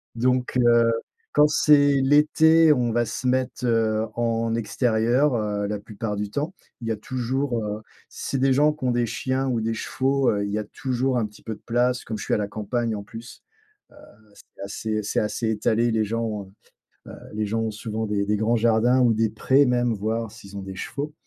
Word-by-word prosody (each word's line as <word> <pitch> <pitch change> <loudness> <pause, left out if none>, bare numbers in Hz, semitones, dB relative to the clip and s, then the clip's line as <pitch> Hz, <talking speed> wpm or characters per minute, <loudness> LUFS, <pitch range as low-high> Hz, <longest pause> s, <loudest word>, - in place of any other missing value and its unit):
donc 125 +1 0
heu, 120 -1 +4 0.4
quand 150 0 +6
c'est 145 -2 +4
l'été, 155 +3 +5
on 120 -3 0
va 120 +1 +1
se 130 - -4
mettre, 130 0 -1
heu, 110 -1 +1
en 115 -1 0
extérieur, 120 +4 +1
heu, 105 -2 -1
la 105 0 -3
plupart 105 0 -5
du 105 0 -3
temps, 150 - -3 0.3
il 115 - -5
y - - 0
a 110 - 0
toujours, 125 +2 -2
heu 105 0 -4 0.3
c'est 135 - -4
des 135 0 +3
gens 150 +2 +3
qui 150 - -12
ont 125 - +2
des 120 0 +1
chiens 130 +4 -2
ou 115 -3 0
des 115 +1 -1
chevaux, 135 +3 0
heu, 100 -1 -1
il 100 - -4
y 105 - -1
a 105 - -2
toujours 130 +3 -2
un 110 - 0
petit 105 - -18
peu 110 - -4
de - - -21
place 125 +2 +1
comme 110 -2 -5
je - - -6
suis - - -1
à - - +3
la 105 - -2
campagne 110 +2 -2
en 100 - -6
plus. 115 +3 -11 0.5
Heu, - - -19 0.4
c'est - - -15
assez, 110 +2 -3
c'est 100 - -1
assez 110 +1 -2
étalé. 110 +2 +1
Les 110 -1 +1
gens 115 +2 -2
ont, 105 -3 -5 0.6
heu, - - -9 0.2
les 105 0 -1
gens 115 +2 -1
ont 110 -1 -1
souvent 110 +1 -4
des 105 -1 -1
des 105 +1 +1
grands 110 +3 +1
jardins 115 +3 +3
ou 120 -2 +4
des 110 0 +1
prés 130 +6 +3
même, 120 -1 +1
voire 110 +2 -2
s'ils 100 -2 -11
ont 100 - -5
des 95 0 -7
chevaux. 145 +10 -5
115 Hz, 215 wpm, -24 LUFS, 110-130 Hz, 0.6 s, quand